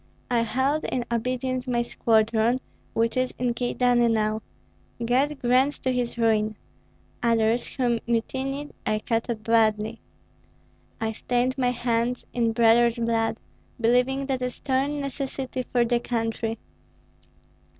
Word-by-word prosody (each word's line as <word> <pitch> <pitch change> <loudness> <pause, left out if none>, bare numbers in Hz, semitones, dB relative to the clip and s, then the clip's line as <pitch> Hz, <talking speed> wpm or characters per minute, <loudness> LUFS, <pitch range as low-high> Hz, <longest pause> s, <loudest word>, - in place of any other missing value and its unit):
I 240 - +3
held 265 +6 0
in 245 -2 -2
obedience 255 +2 -1
my 240 -1 +1
squadron, 225 +1 +2 0.3
which 230 0 +1
is 255 0 0
in 245 -1 0
Kyedani 245 0 +2
now, 215 -1 +1 0.6
God 275 +5 +2
grant 255 +4 +3
to 260 - +1
his 245 -1 -2
ruin! 215 -2 +2 0.6
Others, 230 0 +1
who 240 -3 +1
mutinied, 265 +5 -2
I 215 - +1
cut 230 +2 -1
up 220 -2 -3
badly. 220 0 +2 1.0
I 220 -1 -1
stained 245 +3 0
my 250 -2 +1
hands 240 0 -1
in 230 -2 +1
brothers' 235 +1 +4
blood, 230 -1 0 0.4
believing 250 +4 +2
that 265 -2 -2
a 250 - 0
stern 275 +3 -1
necessity 270 -1 -3
for 240 -1 +3
the 240 0 +2
country. 225 -1 -2
240 Hz, 130 wpm, -25 LUFS, 225-255 Hz, 1.0 s, brothers